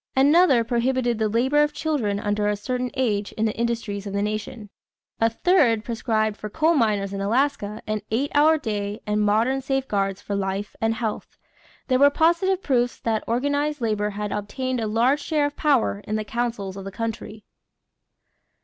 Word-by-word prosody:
Another 280 -2 +5
prohibited 240 0 0
the 215 -1 +1
labor 260 +7 +2
of 295 0 +1
children 280 -11 -1
under 205 0 0
a 210 - +1
certain 250 +4 -3
age 210 -6 -1
in 220 - -1
the 215 - -1
industries 230 -4 -2
of 200 - -5
the 200 0 0
nation. 215 0 -5 0.5
A 225 - +3
third 230 - +2
prescribed 220 -2 -1
for 215 - -6
coal 320 +8 +2
miners 210 -8 +1
in 195 - -3
Alaska 220 -1 0
an 215 -1 -2
eight 260 +6 -1
hour 310 +2 +5
day 210 -6 -3
and 210 0 0
modern 225 +6 +2
safeguards 210 -8 -1
for 205 - -6
life 195 +1 -3
and 225 0 +1
health. 220 -2 -4 0.5
There 255 -1 +2
were 285 +1 +7
positive 345 +5 +2
proofs 245 -3 0
that 220 -2 -1
organized 285 +5 0
labor 210 -3 0
had 210 0 -4
obtained 255 +5 -3
a 220 - -1
large 240 +7 +2
share 300 -2 0
of 290 0 -3
power 275 -9 +1
in 215 - -1
the 215 0 -2
councils 215 -4 -3
of 195 - -7
the 195 - -7
country. 220 0 -5
230 Hz, 175 wpm, -24 LUFS, 210-270 Hz, 0.5 s, were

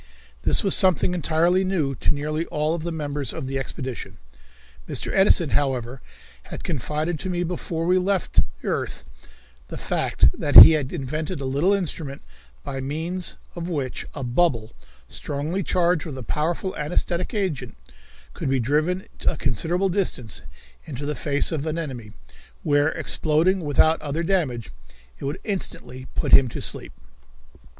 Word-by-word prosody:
This - - +2
was 195 - +2
something 185 -1 +3
entirely 175 +2 +2
new 170 -8 0
to - - 0
nearly 155 +3 -2
all 155 +2 0
the 170 +2 -4
members 145 -4 -3
of 160 - -5
the 135 +1 -2
expedition. 130 -2 -6 0.7
Mr. - - -2
Edison, 190 -5 +4
however, 130 -3 -1 0.4
had - - -8
confided 155 +3 -2
to 190 - -4
me 175 -1 -1
before 165 -1 -3
we 180 +2 +4
left 190 0 -1
the - - 0
earth - - -3 0.6
the - - -7
fact - - +1
that - - -2
he 95 - +14
had 150 -4 0
invented 155 +2 -3
a 135 - -4
little 140 +8 +2
instrument 165 -7 -2 0.4
by 135 - -4
means 160 +7 -3 0.2
of 170 0 -5
which 140 -7 -3
a 140 - -4
bubble, 120 -3 +1 0.3
strongly 150 - -3
charged 175 -2 +1
with 140 -4 -6
a 130 - -6
powerful 165 +8 -2
anaesthetic 175 +6 -1
agent, 150 - -2 0.6
could - - -3
be 135 -1 +2
driven 155 - 0
to - - +1
a 165 - -3
considerable 165 - +1
distance 170 - -1 0.4
into 145 -3 -6
the 150 - -1
face 145 -1 -1
of 160 -1 -2
an 155 +1 -2
enemy, 125 -9 -5 0.5
where, 145 0 +3
exploding 160 +5 +2
without 155 0 +3
other 150 +2 -2
damage, 145 - -1 0.5
it - - -6
would 140 +2 -3
instantly 130 - -4
put - - -1
him 135 - +7
to - - -6
sleep. - - -2
155 Hz, 155 wpm, -24 LUFS, 135-175 Hz, 0.7 s, he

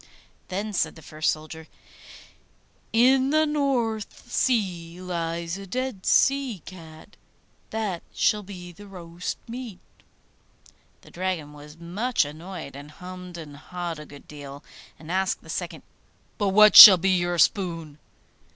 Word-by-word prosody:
Then 205 +3 -4
said - - -1
the 160 - -14
first 155 +1 -2
soldier, 155 +1 -8 1.2
'In 260 +3 +4
the 310 +2 +3
North 245 -7 -2
Sea 180 -10 -1
lies 170 0 -4
a 195 - -10
dead 255 -2 -4
sea 270 - +2
cat; 165 0 -13 0.5
that 210 -6 -3
shall 210 - +1
be 185 -3 -10
the 205 +4 -14
roast 175 -2 -7
meat.' 235 -4 -7 1.2
The - - -18
Dragon 175 -5 -4
was 150 +1 -13
much 185 - -1
annoyed, 160 0 -9
and 145 +1 -10
hummed 180 +2 -10
and 150 -3 -10
hawed 170 +2 -6
a 150 - -10
good 145 0 -15
deal, 145 -1 -10 0.3
and 160 +1 -10
asked 190 +1 -1
the - - -9
second, - - -5 0.6
'But 205 -2 +1
what 210 +2 +6
shall 195 -4 +13
be 190 +2 +1
your 175 -1 0
spoon? 165 -5 0
180 Hz, 135 wpm, -25 LUFS, 165-210 Hz, 1.2 s, shall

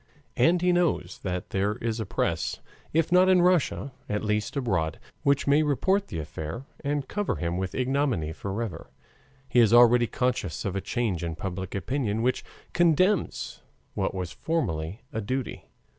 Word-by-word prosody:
And 175 +1 +3
he 180 - +4
knows 160 - 0
that 90 +1 -4
there 100 +2 0
is 115 0 -3
a 110 - -3
press, - - -1 0.3
if 165 +2 +1
not 180 +1 +6
in 180 -2 +5
Russia, 175 -5 +2 0.2
at 105 +1 -1
least 105 +4 -1
abroad, 95 -12 0 0.2
which 140 -2 +2
may 145 +2 +4
report 190 +7 +1
the 85 - -5
affair 80 - -5 0.2
and 145 -1 -1
cover 205 0 -1
him 85 0 -2
with 95 +1 -3
ignominy 130 - 0
forever. 100 +4 -5 0.6
He 125 - +3
is 115 -3 +6
already 120 0 +7
conscious 125 0 -1
of 100 -1 -2
a 100 - -1
change 100 -8 -1
in 85 -1 -3
public 95 +2 -5
opinion 115 0 -1
which 125 +1 +1 0.3
condemns 175 +3 +2 0.3
what - - -1
was 90 -2 -3
formerly 100 - -2
a 110 - -2
duty. 130 +5 -4
120 Hz, 160 wpm, -27 LUFS, 95-145 Hz, 0.6 s, already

